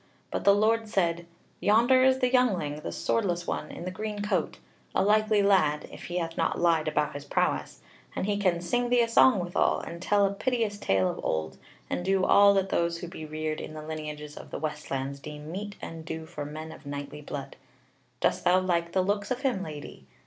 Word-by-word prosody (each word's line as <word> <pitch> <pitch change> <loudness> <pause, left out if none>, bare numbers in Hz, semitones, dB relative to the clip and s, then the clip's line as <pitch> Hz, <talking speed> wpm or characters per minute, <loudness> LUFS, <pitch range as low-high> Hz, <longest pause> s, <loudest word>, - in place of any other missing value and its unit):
But - - -3
the 200 0 +7
Lord 225 +2 +2
said: 170 -4 0 0.3
"Yonder 235 +5 +4
is 260 0 +5
the 250 -1 +1
youngling, 190 - +2
the 150 - -5
swordless 175 -6 0
one - - -3
in 175 - -8
the 185 - -3
green 210 +2 -4
coat; 190 -6 -1 0.4
a - - +3
likely 215 0 +3
lad, 170 -7 +3
if - - -10
he 175 - -3
hath 165 -1 -2
not - - 0
lied 165 -2 +3
about 150 -1 0
his 145 0 -6
prowess; 145 - -1 0.3
and - - -1
he 205 0 0
can 185 -4 +1
sing 240 +8 0
thee 245 0 +4
a - - 0
song 230 0 +6
withal, 175 0 +1
and 170 0 -8
tell 205 +1 +3
a 195 - 0
piteous 225 -2 -1
tale 95 - +2
of - - -4
old, 80 0 -2 0.3
and 175 - -2
do 190 0 +2
all 200 0 +6
that 195 0 +1
those 170 -1 0
who 175 +1 -6
be 160 -3 -8
reared 155 0 -3
in 155 - -8
the 155 - -7
lineages 150 -1 -6
of - - -10
the - - -5
westlands 140 -3 -4
deem 150 +2 -8
meet 200 +2 -5
and 165 -1 -7
due 160 0 -5
for 145 -2 -6
men 155 +2 -7
of 150 - -12
knightly 145 +1 -6
blood. 145 -1 -6 0.7
Dost - - +1
thou 180 +1 +5
like 170 -2 0
the 185 - +3
looks 205 +1 -1
of 255 0 -2
him, 255 -8 0
lady! 145 - -8
175 Hz, 215 wpm, -28 LUFS, 155-205 Hz, 0.7 s, the